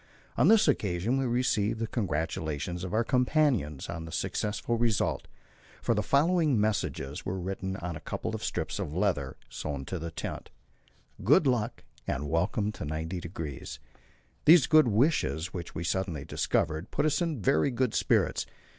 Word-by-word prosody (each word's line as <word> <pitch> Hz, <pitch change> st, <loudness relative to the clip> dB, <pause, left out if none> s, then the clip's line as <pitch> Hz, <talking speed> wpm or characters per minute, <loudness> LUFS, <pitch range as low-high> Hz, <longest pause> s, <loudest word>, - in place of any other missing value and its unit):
On 130 Hz, -, +4 dB
this 220 Hz, -1 st, +6 dB
occasion 110 Hz, -, +1 dB
we 135 Hz, -, 0 dB
received 120 Hz, -3 st, +1 dB
the 115 Hz, -, 0 dB
congratulations 80 Hz, -, -2 dB
of 95 Hz, -, -4 dB
our 110 Hz, +3 st, +2 dB
companions 125 Hz, -, +1 dB
on 85 Hz, -1 st, -5 dB
the 80 Hz, -, -8 dB
successful 105 Hz, +7 st, -1 dB
result, 115 Hz, -4 st, 0 dB, 0.5 s
for -, -, +1 dB
the 105 Hz, -, +1 dB
following 150 Hz, -, +3 dB
messages 100 Hz, -9 st, -1 dB
were 95 Hz, +1 st, -3 dB
written 95 Hz, +1 st, -3 dB
on 90 Hz, -3 st, -5 dB
a -, -, -6 dB
couple 75 Hz, -, -4 dB
of -, -, -4 dB
strips -, -, -2 dB
of 75 Hz, -, -4 dB
leather, 85 Hz, -9 st, 0 dB
sewed 70 Hz, +3 st, -5 dB
to 95 Hz, -, -3 dB
the 85 Hz, +1 st, -4 dB
tent 80 Hz, -, -6 dB, 0.7 s
"Good 145 Hz, -, +5 dB
luck," 120 Hz, -3 st, 0 dB, 0.2 s
and 75 Hz, +3 st, -2 dB
"Welcome 90 Hz, +6 st, 0 dB
to 95 Hz, -, -8 dB
90°." 80 Hz, -1 st, -5 dB, 0.7 s
These 160 Hz, -3 st, +8 dB
good 155 Hz, -4 st, +6 dB
wishes, 110 Hz, -, +1 dB
which 85 Hz, -2 st, -6 dB
we 85 Hz, -, -3 dB
suddenly 85 Hz, -4 st, -2 dB
discovered, 80 Hz, +4 st, -1 dB
put -, -, 0 dB
us 155 Hz, +2 st, +1 dB
in 165 Hz, -6 st, -1 dB
very 90 Hz, -, +3 dB
good 125 Hz, -2 st, 0 dB
spirits. -, -, +1 dB
100 Hz, 160 wpm, -29 LUFS, 80-125 Hz, 0.7 s, These